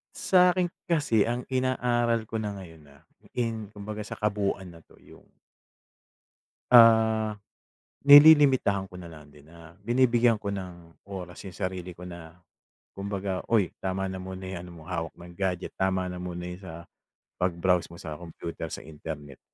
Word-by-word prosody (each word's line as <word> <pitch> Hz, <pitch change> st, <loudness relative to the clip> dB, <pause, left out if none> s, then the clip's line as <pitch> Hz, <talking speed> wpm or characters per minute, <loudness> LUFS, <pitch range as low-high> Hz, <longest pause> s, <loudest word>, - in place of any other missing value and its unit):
Sa'kin 180 Hz, -1 st, +3 dB, 0.2 s
kasi 130 Hz, -10 st, +3 dB
ang 120 Hz, +1 st, -3 dB
inaaral 120 Hz, -3 st, 0 dB
ko 115 Hz, -, -7 dB
na 110 Hz, -2 st, -2 dB
ngayon 80 Hz, -4 st, -12 dB
na 70 Hz, -1 st, -19 dB, 0.3 s
in 110 Hz, -4 st, -3 dB
kumbaga 105 Hz, 0 st, -6 dB
sa 105 Hz, -, -8 dB
kabuuan 100 Hz, -2 st, -1 dB
na 80 Hz, -, -16 dB
to -, -, -22 dB
yung -, -, -17 dB, 1.5 s
ah, 110 Hz, -2 st, +6 dB, 0.7 s
nililimitahan 140 Hz, -9 st, +7 dB
ko 90 Hz, -, -10 dB
na 85 Hz, -, -9 dB
lang 75 Hz, -3 st, -13 dB
din 75 Hz, 0 st, -18 dB
na 85 Hz, 0 st, -14 dB, 0.2 s
binibigyan 120 Hz, -1 st, +4 dB
ko 100 Hz, -1 st, -4 dB
ng 90 Hz, -4 st, -8 dB
oras 95 Hz, -1 st, -8 dB
yung 90 Hz, -, -9 dB
sarili 90 Hz, -2 st, -4 dB
ko 90 Hz, -, -14 dB
na 85 Hz, -2 st, -10 dB, 0.6 s
kumbaga, 100 Hz, -1 st, -3 dB
"Uy 105 Hz, -7 st, +2 dB
tama 95 Hz, 0 st, -2 dB
na 95 Hz, -1 st, -5 dB
muna 95 Hz, 0 st, -7 dB
yan 90 Hz, -2 st, -6 dB
ano 90 Hz, -, -11 dB
mo 80 Hz, -, -13 dB
hawak 85 Hz, -1 st, -3 dB
ng 85 Hz, 0 st, -12 dB
gadget, 95 Hz, -2 st, -3 dB
tama 95 Hz, -1 st, 0 dB
na 90 Hz, 0 st, -6 dB
muna 90 Hz, -1 st, -5 dB
yung 90 Hz, +2 st, -8 dB
sa 85 Hz, -1 st, -9 dB, 0.5 s
pag-browse 90 Hz, 0 st, +1 dB
mo 85 Hz, -, -13 dB
sa 80 Hz, -2 st, -8 dB
kompyuter 85 Hz, -1 st, -7 dB
sa -, -, -7 dB
internet." 75 Hz, -3 st, -9 dB
95 Hz, 160 wpm, -27 LUFS, 85-110 Hz, 1.5 s, nililimitahan